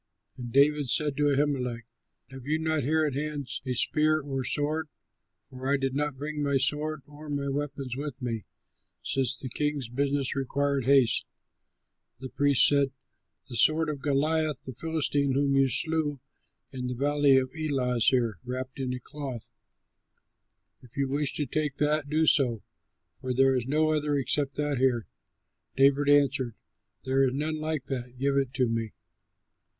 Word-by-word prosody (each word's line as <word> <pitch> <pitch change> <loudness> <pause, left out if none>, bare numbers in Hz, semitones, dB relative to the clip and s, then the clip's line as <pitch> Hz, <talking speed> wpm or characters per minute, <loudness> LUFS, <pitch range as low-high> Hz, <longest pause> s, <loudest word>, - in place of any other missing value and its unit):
And 120 -2 -7
David 145 0 +3
said 145 +2 +2
to 145 -1 +3
Ahimelech, 130 -5 -1 0.5
"Have 135 -1 -10
you 155 +1 +1
not 160 -1 0
here 155 +4 +1
at 145 - -1
hand 145 -1 -3 0.2
a 125 - -1
spear 155 +4 +2
or 135 -2 -4
sword? 150 +4 0 0.6
For 130 +1 -3
I 140 - +3
did 135 -1 -2
not 145 -1 -2
bring 150 +2 -4
my 140 -1 +2
sword 150 +2 0
or 150 +1 -11
my 140 -1 -2
weapons 135 -2 -4
with 140 -1 -5
me, 115 -5 -4 0.6
since 135 -1 0
the 130 - -6
king's 145 -1 -2
business 140 +2 -1
required 140 0 -1
haste." 135 -3 +4 0.9
The 130 +1 -8
priest 140 0 +4
said, 140 -2 +2 0.6
"The 125 - -8
sword 155 +7 +4
of 145 -3 -4
Goliath 155 +1 0
the 130 - -7
Philistine 145 -2 0
whom 140 0 +1
you 135 0 +4
slew 155 0 +1 0.5
in 125 -2 -5
the 125 - -3
valley 145 +1 +3
of 130 -1 0
Elah 135 -6 -1
is 115 - +4
there, 115 -7 0
wrapped 130 +1 -6
in 130 -1 -2
a - - -6
cloth. 135 -3 -7 1.3
If 125 0 -18
you 140 -1 0
wish 145 +1 0
to 150 - -1
take 150 +1 -2
that, 150 -1 +1
do 155 +2 +2
so, 125 -8 +3 0.6
for 130 -1 -3
there 135 +1 +4
is 125 -1 -2
no 155 +2 +2
other 150 -1 0
except 140 +1 0
that 145 -3 -1
here." 125 -4 +2 0.7
David 140 +1 +4
answered, 140 -5 +3 0.5
"There 135 +1 +1
is 130 - -2
none 155 +2 -2
like 155 -3 -3
that; 125 -2 -5
give 140 +2 0
it 135 -2 +1
to 130 -2 +2
me." 115 -1 -3
140 Hz, 165 wpm, -28 LUFS, 130-150 Hz, 1.3 s, haste